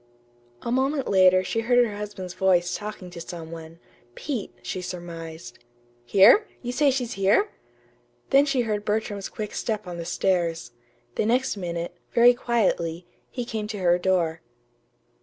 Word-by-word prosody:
A 235 Hz, -, -3 dB
moment 270 Hz, +2 st, +1 dB
later 185 Hz, -1 st, +5 dB
she 225 Hz, -, -2 dB
heard 240 Hz, +2 st, +2 dB
her 210 Hz, -3 st, -5 dB
husband's 200 Hz, -3 st, -6 dB
voice 180 Hz, -2 st, +2 dB
talking 205 Hz, -3 st, -7 dB
to 170 Hz, -, -8 dB
some 165 Hz, -1 st, -8 dB
one 165 Hz, 0 st, -9 dB, 0.4 s
Pete, 235 Hz, -, -4 dB
she 180 Hz, +9 st, -4 dB
surmised. 165 Hz, -7 st, -8 dB, 0.5 s
"Here? 215 Hz, -, +6 dB, 0.2 s
You 245 Hz, -, -3 dB
say 285 Hz, +3 st, +3 dB
she's 250 Hz, -3 st, -1 dB
here?" 200 Hz, -, +2 dB, 0.8 s
Then 275 Hz, +2 st, +5 dB
she 270 Hz, -3 st, +2 dB
heard 210 Hz, -3 st, -2 dB
Bertram's 210 Hz, -2 st, -2 dB
quick 210 Hz, -1 st, -6 dB
step 215 Hz, -2 st, -2 dB
on 175 Hz, -1 st, -6 dB
the 170 Hz, -, -5 dB
stairs. 170 Hz, -4 st, 0 dB, 0.5 s
The -, -, +1 dB
next 255 Hz, +2 st, +1 dB
minute, 170 Hz, -2 st, -4 dB, 0.2 s
very 240 Hz, +1 st, +7 dB
quietly, 185 Hz, -9 st, 0 dB, 0.2 s
he 245 Hz, -2 st, -4 dB
came 220 Hz, -2 st, -4 dB
to 210 Hz, -1 st, -5 dB
her 175 Hz, -2 st, +3 dB
door. 175 Hz, -3 st, +1 dB
195 Hz, 155 wpm, -25 LUFS, 175-235 Hz, 0.8 s, very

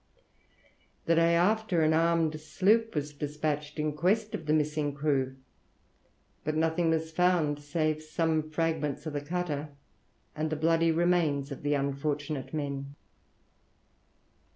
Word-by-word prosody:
The 165 Hz, -, +3 dB
day 165 Hz, 0 st, +4 dB
after, 185 Hz, -1 st, +2 dB
an 155 Hz, 0 st, +3 dB
armed 165 Hz, -1 st, +2 dB
sloop 205 Hz, +8 st, +2 dB
was 150 Hz, 0 st, -2 dB
despatched 150 Hz, +1 st, -3 dB
in 150 Hz, 0 st, -1 dB
quest 200 Hz, +7 st, +1 dB
of 160 Hz, -, -5 dB
the 150 Hz, -, +3 dB
missing 150 Hz, -1 st, 0 dB
crew; 140 Hz, -3 st, 0 dB, 1.1 s
but 155 Hz, 0 st, -1 dB
nothing 160 Hz, +1 st, +1 dB
was 160 Hz, 0 st, 0 dB
found 160 Hz, -4 st, +2 dB
save 155 Hz, +1 st, -1 dB
some 155 Hz, 0 st, -1 dB
fragments 155 Hz, -2 st, -1 dB
of 155 Hz, -, -4 dB
the 145 Hz, -, -2 dB
cutter 155 Hz, -2 st, -3 dB, 0.7 s
and 155 Hz, 0 st, -1 dB
the 155 Hz, -, -1 dB
bloody 165 Hz, +1 st, +3 dB
remains 160 Hz, -4 st, +1 dB
of 140 Hz, -, -6 dB
the 145 Hz, 0 st, +1 dB
unfortunate 140 Hz, +1 st, -2 dB
men. 140 Hz, -2 st, -4 dB
155 Hz, 130 wpm, -29 LUFS, 145-165 Hz, 1.1 s, day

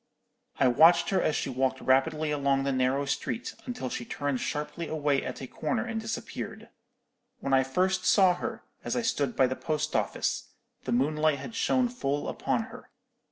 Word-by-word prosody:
I 130 Hz, -, +5 dB
watched 170 Hz, +7 st, +5 dB
her 190 Hz, -, +2 dB
as 155 Hz, -, +1 dB
she 135 Hz, -, -2 dB
walked 130 Hz, +1 st, 0 dB
rapidly 150 Hz, +4 st, +2 dB
along 140 Hz, -2 st, +1 dB
the 140 Hz, -, 0 dB
narrow 130 Hz, +2 st, +1 dB
street, 230 Hz, -, -3 dB
until 245 Hz, -, -4 dB
she 120 Hz, -, -4 dB
turned 145 Hz, +1 st, -2 dB
sharply 150 Hz, +4 st, -3 dB
away 145 Hz, -3 st, 0 dB
at -, -, -6 dB
a -, -, -5 dB
corner 225 Hz, -, -2 dB
and 225 Hz, -1 st, -3 dB
disappeared. 225 Hz, 0 st, -6 dB, 0.7 s
When 135 Hz, -, -2 dB
I 135 Hz, -, +6 dB
first 185 Hz, +7 st, 0 dB
saw 190 Hz, -3 st, +5 dB
her, 175 Hz, -, -5 dB, 0.2 s
as -, -, -2 dB
I 240 Hz, -, 0 dB
stood 145 Hz, -, 0 dB
by 130 Hz, -, +5 dB
the 130 Hz, +1 st, -1 dB
post 155 Hz, +1 st, -2 dB
office, -, -, -1 dB, 0.3 s
the 130 Hz, -, -2 dB
moonlight 150 Hz, +4 st, +2 dB
had 140 Hz, +11 st, -8 dB
shone 250 Hz, +2 st, +2 dB
full 145 Hz, -, -2 dB
upon -, -, -1 dB
her. -, -, -12 dB
150 Hz, 180 wpm, -28 LUFS, 135-180 Hz, 0.7 s, I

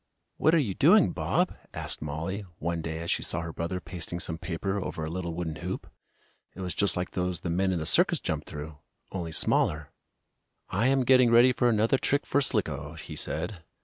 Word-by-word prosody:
"What 160 Hz, -, +4 dB
are -, -, +5 dB
you 120 Hz, -11 st, +1 dB
doing, -, -, +5 dB
Bob?" -, -, 0 dB, 0.2 s
asked -, -, -3 dB
Mollie, 80 Hz, +7 st, -4 dB
one 85 Hz, +1 st, -2 dB
day 80 Hz, 0 st, -4 dB
as 85 Hz, -, -2 dB
she -, -, 0 dB
saw 85 Hz, -, +1 dB
her 80 Hz, -1 st, -6 dB
brother 85 Hz, +4 st, -3 dB
pasting 85 Hz, 0 st, -6 dB
some 80 Hz, -1 st, -2 dB
paper 95 Hz, +4 st, -2 dB
over 80 Hz, -, -4 dB
a 80 Hz, -, -5 dB
little 85 Hz, -2 st, -4 dB
wooden 80 Hz, -3 st, -3 dB
hoop. -, -, -5 dB, 0.7 s
It 95 Hz, -, -7 dB
was 90 Hz, -1 st, -2 dB
just 100 Hz, -2 st, +2 dB
like 90 Hz, 0 st, -2 dB
those 90 Hz, -1 st, -2 dB
the 85 Hz, -, -2 dB
men 95 Hz, +2 st, +1 dB
in 90 Hz, -, 0 dB
the 80 Hz, -, -3 dB
circus -, -, +4 dB
jump -, -, -3 dB
through, 75 Hz, 0 st, -8 dB, 0.3 s
only 85 Hz, -4 st, -4 dB
smaller. 75 Hz, -1 st, +1 dB, 0.8 s
"I 100 Hz, +6 st, +1 dB
am 135 Hz, 0 st, +3 dB
getting 130 Hz, -1 st, +6 dB
ready 120 Hz, +2 st, +6 dB
for 125 Hz, 0 st, +2 dB
another 115 Hz, +4 st, +2 dB
trick 140 Hz, +1 st, +1 dB
for 140 Hz, -, +2 dB
Slicko," 75 Hz, -, -1 dB
he 80 Hz, -, -8 dB
said. 90 Hz, +2 st, -3 dB
90 Hz, 205 wpm, -28 LUFS, 80-105 Hz, 0.8 s, getting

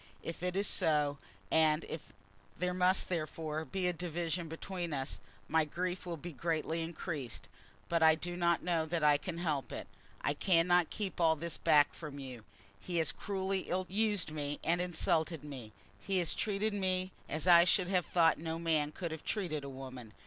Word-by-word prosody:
If 165 Hz, -, -5 dB
it 180 Hz, 0 st, -1 dB
is 200 Hz, +1 st, +2 dB
so, 150 Hz, -6 st, +1 dB, 0.3 s
and 160 Hz, 0 st, +4 dB
if 160 Hz, -, -7 dB, 0.5 s
there 180 Hz, +1 st, 0 dB
must 185 Hz, +1 st, +3 dB
therefore 155 Hz, -2 st, -3 dB
be 185 Hz, +6 st, -2 dB
a 180 Hz, -, +2 dB
division 170 Hz, 0 st, -2 dB
between 170 Hz, +1 st, -4 dB
us, 135 Hz, 0 st, -3 dB, 0.3 s
my 160 Hz, +1 st, +3 dB
grief 180 Hz, +4 st, -3 dB
will 170 Hz, -1 st, -3 dB
be 170 Hz, +3 st, -7 dB
greatly 165 Hz, +2 st, -1 dB
increased; 160 Hz, -, -5 dB, 0.4 s
but 170 Hz, -1 st, +1 dB
I 160 Hz, 0 st, +7 dB
do 175 Hz, +2 st, -4 dB
not 170 Hz, -1 st, +2 dB
know 165 Hz, -2 st, +1 dB
that 165 Hz, -1 st, -1 dB
I 145 Hz, -1 st, +6 dB
can 175 Hz, 0 st, -5 dB
help 155 Hz, -6 st, -1 dB
it. -, -, -5 dB, 0.3 s
I -, -, +1 dB
cannot 175 Hz, -1 st, +3 dB
keep 195 Hz, -4 st, -3 dB
all 160 Hz, -1 st, +5 dB
this 170 Hz, +2 st, -4 dB
back 145 Hz, -1 st, +5 dB
from 150 Hz, -3 st, -8 dB
you. 130 Hz, -5 st, -8 dB, 0.4 s
He 175 Hz, -, -3 dB
has 160 Hz, -2 st, +2 dB
cruelly 195 Hz, -1 st, -2 dB
ill 185 Hz, +1 st, 0 dB
used 205 Hz, -3 st, +1 dB
me 145 Hz, -1 st, -3 dB
and 175 Hz, +2 st, +2 dB
insulted 165 Hz, -3 st, 0 dB
me. 130 Hz, -7 st, -8 dB, 0.3 s
He 195 Hz, -1 st, -1 dB
has 175 Hz, -3 st, +1 dB
treated 210 Hz, 0 st, 0 dB
me 185 Hz, -2 st, 0 dB, 0.2 s
as 155 Hz, +2 st, -1 dB
I 170 Hz, -1 st, +9 dB
should 185 Hz, 0 st, +2 dB
have 185 Hz, -3 st, +1 dB
thought 165 Hz, -2 st, +4 dB
no 160 Hz, 0 st, -3 dB
man 160 Hz, -3 st, +1 dB
could 170 Hz, 0 st, -4 dB
have 160 Hz, -1 st, -6 dB
treated 170 Hz, -9 st, -2 dB
a 140 Hz, -, -6 dB
woman. 130 Hz, -4 st, -9 dB
165 Hz, 185 wpm, -33 LUFS, 155-180 Hz, 0.5 s, I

